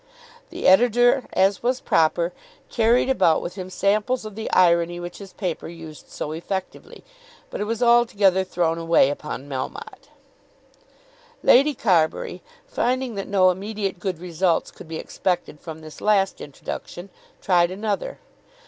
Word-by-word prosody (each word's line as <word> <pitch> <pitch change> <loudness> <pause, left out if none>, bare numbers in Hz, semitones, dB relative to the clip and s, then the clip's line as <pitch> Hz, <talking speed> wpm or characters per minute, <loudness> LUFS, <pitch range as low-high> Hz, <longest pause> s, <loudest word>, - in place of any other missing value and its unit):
The - - -7
editor, 245 +5 +4
as 195 +1 +2
was 250 +2 0
proper, 170 -1 +1 0.4
carried 235 +2 +3
about 170 -12 +3
with 175 - -6
him 185 -1 -7
samples 210 +6 0
of 215 - -7
the 220 +2 -5
irony 175 -1 +3
which 175 0 -8
his 195 -2 -10
paper 180 -5 -4
used 165 -2 -11
so 150 - -5
effectively, 185 +4 -6 0.5
but - - -5
it - - -1
was 230 +3 -2
altogether 210 -6 +4
thrown 170 -3 -1
away 165 -4 +3
upon 145 -1 -6
Melmotte. 390 - -7 1.3
Lady 280 +3 +5
Carbury 185 - +1 0.2
finding 255 0 -1
that 195 -2 -5
no 185 -2 +4
immediate 195 0 -4
good 185 -1 -3
results 170 0 -1
could - - -13
be 160 0 -5
expected 180 -5 -3
from 160 -1 -9
this 155 -1 -12
last 200 -2 +2
introduction, 175 +6 -8 0.3
tried 175 -2 +3
another. 210 - -3
190 Hz, 140 wpm, -23 LUFS, 170-220 Hz, 1.3 s, Lady